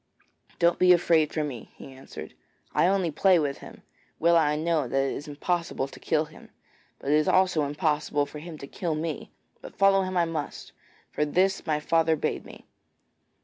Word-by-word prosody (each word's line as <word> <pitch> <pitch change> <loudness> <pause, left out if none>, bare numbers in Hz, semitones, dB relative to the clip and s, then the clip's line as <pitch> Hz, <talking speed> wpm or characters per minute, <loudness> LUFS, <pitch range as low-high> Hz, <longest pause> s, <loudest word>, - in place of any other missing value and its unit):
'Don't 170 0 +2
be 180 0 +6
afraid 165 -3 +3
for 155 - -1
me,' 130 -6 -6
he 135 - -11
answered; 105 -12 -10 0.4
'I - - +3
only 190 -3 +1
play 185 +4 +4
with 145 -4 -1
him. - - -13 0.3
Well 170 +1 +3
I 150 -2 +3
know 155 -3 0
that 135 - -2
it 135 0 +1
is 145 - -7
impossible 150 -1 -2
to - - -13
kill 155 -1 0
him, 155 +1 -16 0.5
but 140 - -3
it - - +5
is 155 - +1
also 180 -5 +3
impossible 150 -1 0
for 150 +1 -9
him 165 0 -9
to 140 - -8
kill 165 +2 -3
me; 155 0 -4 0.3
but - - -11
follow 195 0 +4
him 185 -1 -2
I 170 - +3
must, 160 -3 -5 0.4
for - - 0
this 185 +5 +1
my 150 -1 +1
father 160 +1 +2
bade - - -3
me.' - - -13
155 Hz, 190 wpm, -26 LUFS, 150-175 Hz, 0.5 s, be